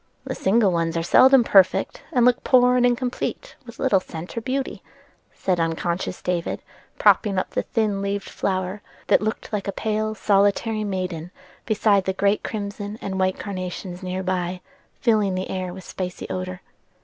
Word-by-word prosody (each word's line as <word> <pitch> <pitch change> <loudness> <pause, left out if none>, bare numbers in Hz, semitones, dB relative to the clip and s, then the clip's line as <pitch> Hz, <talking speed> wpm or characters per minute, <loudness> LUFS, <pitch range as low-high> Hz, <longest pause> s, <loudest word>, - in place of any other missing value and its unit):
"The - - -4
single 200 0 +3
ones 165 -1 0
are 165 - 0
seldom 260 +8 +6
perfect, 195 -5 +3
and 245 -2 +3
look 250 +1 +3
poor 250 -1 +5
and 245 0 +4
incomplete 250 - -2
with 235 - -11
little 235 -8 +3
scent 170 -1 -8
or 230 - -2
beauty," 260 +3 -3 0.5
said 180 -2 -1
unconscious 170 +2 -2
David 175 -2 -2 0.3
propping 200 -4 +4
up 185 - -1
the - - 0
thin 210 -3 -1
leaved 200 0 -2
flower, 190 +1 -2 0.3
that - - +5
looked 215 +1 -3
like 205 -1 -2
a - - 0
pale 215 +1 -2
solitary 205 +2 +2
maiden, 185 -4 -3 0.4
beside 205 -3 +3
the 190 - 0
great 200 +2 +1
crimson 205 0 -5
and 190 -1 -4
white 185 0 +1
carnations 185 -1 -5
near 185 0 -3
by, 180 -1 -2 0.4
filling 210 -5 +2
the 185 +1 -3
air 185 -1 -3
with 185 +1 -9
spicy 180 -1 -5
odor. 185 0 -4
195 Hz, 165 wpm, -23 LUFS, 185-215 Hz, 0.5 s, seldom